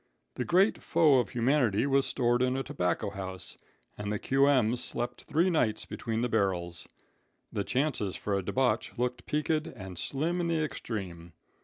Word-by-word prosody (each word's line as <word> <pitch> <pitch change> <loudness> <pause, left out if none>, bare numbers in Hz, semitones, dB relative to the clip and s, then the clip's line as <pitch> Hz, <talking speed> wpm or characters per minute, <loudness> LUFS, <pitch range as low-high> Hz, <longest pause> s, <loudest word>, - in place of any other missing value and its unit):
The 125 - -3
great 190 +5 +3
foe 150 -5 +4
of 115 -6 -1
humanity 120 -2 +2
was 140 -1 +3
stored 120 -1 +1
in 130 +1 +1
a 135 - -1
tobacco 90 +1 -1
house, 95 -2 -2 0.4
and 105 0 -3
the 105 - 0
Q.M. 135 -2 +3
slept 120 0 -2
three 165 +5 +2
nights 110 -10 +1
between 115 -1 -3
the 125 - +1
barrels. 90 -6 0 0.7
The 100 - -1
chances 125 -6 -1
for 105 - -3
a 100 - 0
debauch 120 +2 0
looked 125 +1 -2
peaked 150 +2 0 0.2
and 95 - -8
slim 165 +6 -1
in 170 - -1
the 165 -2 +1
extreme. 90 - -5
120 Hz, 165 wpm, -29 LUFS, 100-140 Hz, 0.7 s, foe